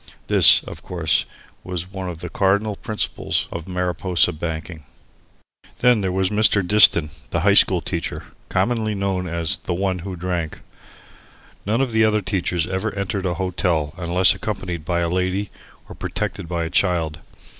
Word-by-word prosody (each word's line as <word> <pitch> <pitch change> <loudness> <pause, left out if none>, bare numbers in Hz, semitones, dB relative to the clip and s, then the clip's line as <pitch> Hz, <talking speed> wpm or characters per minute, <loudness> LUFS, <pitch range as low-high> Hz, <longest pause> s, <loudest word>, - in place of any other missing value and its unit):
This, - - +7
of - - -10
course, 85 -4 0 0.4
was 90 0 -5
one 95 -2 -5
of 85 -2 -8
the 90 - -6
cardinal 100 +3 0
principles 110 0 -2
of 85 +1 -7
Mariposa 90 -1 0
banking. 80 0 -6 1.0
Then 125 -3 +4
there 95 -2 -1
was 95 +1 0
Mr. 105 -3 +3
Diston, 85 -6 +6 0.2
the - - -1
high - - +4
school - - +5
teacher, - - -4 0.3
commonly 110 -3 0
known 95 -2 -2
as 85 -2 -2
the 90 - -4
"one 95 0 -1
who 95 +2 -6
drank." 85 -2 -4 1.1
None 115 +5 +1
of 130 -3 -1
the 110 0 +3
other 105 -1 +2
teachers 90 -4 -1
ever 95 +4 -3
entered 100 -1 -3
a 85 - -2
hotel 85 -4 -1
unless 90 +1 +4
accompanied 90 -6 -5
by 85 0 -1
a 85 - 0
lady 95 +3 -2 0.4
or - - -10
protected - - -5
by 85 -1 -2
a 80 - -5
child. 85 -5 0
90 Hz, 160 wpm, -21 LUFS, 85-100 Hz, 1.1 s, This